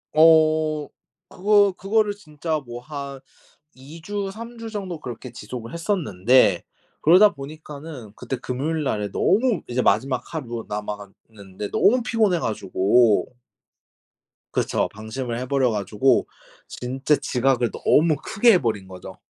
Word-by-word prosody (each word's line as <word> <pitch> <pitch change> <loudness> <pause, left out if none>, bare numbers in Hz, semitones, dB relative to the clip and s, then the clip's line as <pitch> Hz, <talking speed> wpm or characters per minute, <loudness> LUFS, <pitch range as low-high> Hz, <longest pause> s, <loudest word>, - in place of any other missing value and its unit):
어 155 -1 +4 0.4
그거 205 +1 +3
그거를 210 +1 +1
진짜 155 -4 -4
뭐 120 -3 -9
한 140 0 -7 0.6
2 140 +6 -12
주, 205 +1 -3
3 230 +4 -9
주 230 0 -6
정도 190 -6 -5
그렇게 125 -2 -8
지속을 120 -2 -8
했었는데 130 - +2 0.4
그러다 190 +6 +6
보니까는 145 -4 -9
그때 125 +2 -4
금요일날에 130 -4 -2
너무 230 - +2
이제 125 +1 -1
마지막 125 +4 +1
하루 120 -8 -5
남아갔는데 105 -1 -7
너무 245 +4 +3
피곤해 220 -6 +2
가지고 110 - +2 1.2
그쵸. - - 0
방심을 115 +3 -5
해 125 - -4
버려 130 -2 +1
가지고 105 +5 +1 0.4
진짜 135 +4 -1
지각을 125 -3 0
너무 160 0 +3
크게 230 +3 +4
해 180 - +3
버린 110 -6 -2
거죠. 90 -1 -10
140 Hz, 265 characters per minute, -23 LUFS, 115-170 Hz, 1.2 s, 그러다